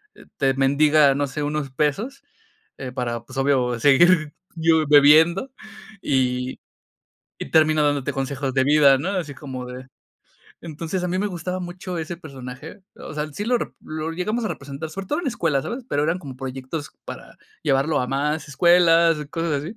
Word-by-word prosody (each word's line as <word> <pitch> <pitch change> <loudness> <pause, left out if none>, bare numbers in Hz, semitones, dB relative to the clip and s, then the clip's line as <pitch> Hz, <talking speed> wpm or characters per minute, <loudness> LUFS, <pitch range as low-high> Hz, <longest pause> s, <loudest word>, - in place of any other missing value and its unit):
eh, - - -16
te 135 -1 +2
mendiga, 140 +1 +4
no 145 +1 0
sé, 150 +3 -5
unos 145 -2 -3
pesos, 155 - -2 0.6
eh, 130 -2 -6
para, 120 -2 -3
pues, 130 - -12
obvio, 130 -3 +1
seguir 155 +3 +4 0.2
yo 160 -1 +3
bebiendo 160 - +5 0.5
y 125 -2 -1 0.8
y - - -8
terminó 155 -1 +4
dándote 145 -2 0
consejos 135 0 -3
de 130 - +3
vida, 140 -1 +5
¿no? 175 +8 -2
Así 170 -8 -3
como 130 -4 -7
de 125 +1 -9 0.7
entonces, 165 +3 -4
a - - -1
mí 185 +1 -1
me 205 - 0
gustaba 180 -1 -4
mucho 180 0 -6
ese 160 +2 -5
personaje, 140 +3 -10
o - - -9
sea, 150 0 -2
sí 205 - -4
lo 245 +2 +2
rep - - -6
lo 155 +1 -5
llegamos 215 +7 -2
a 215 - -1
representar, 140 +3 -7
sobre 195 +3 -7
todo 295 - 0
en 330 - -6
escuelas, 165 - -1
¿sabes? 240 +1 -5
Pero 145 +1 0
eran 165 +3 0
como 135 -4 -9
proyectos 135 +3 -6
para - - -10 0.3
llevarlo 145 +1 +1
a 125 - -1
más 150 +4 -1
escuelas, 170 +2 +4
cosas 160 -4 -2
así. 205 +8 -7
150 Hz, 175 wpm, -22 LUFS, 135-170 Hz, 0.8 s, bebiendo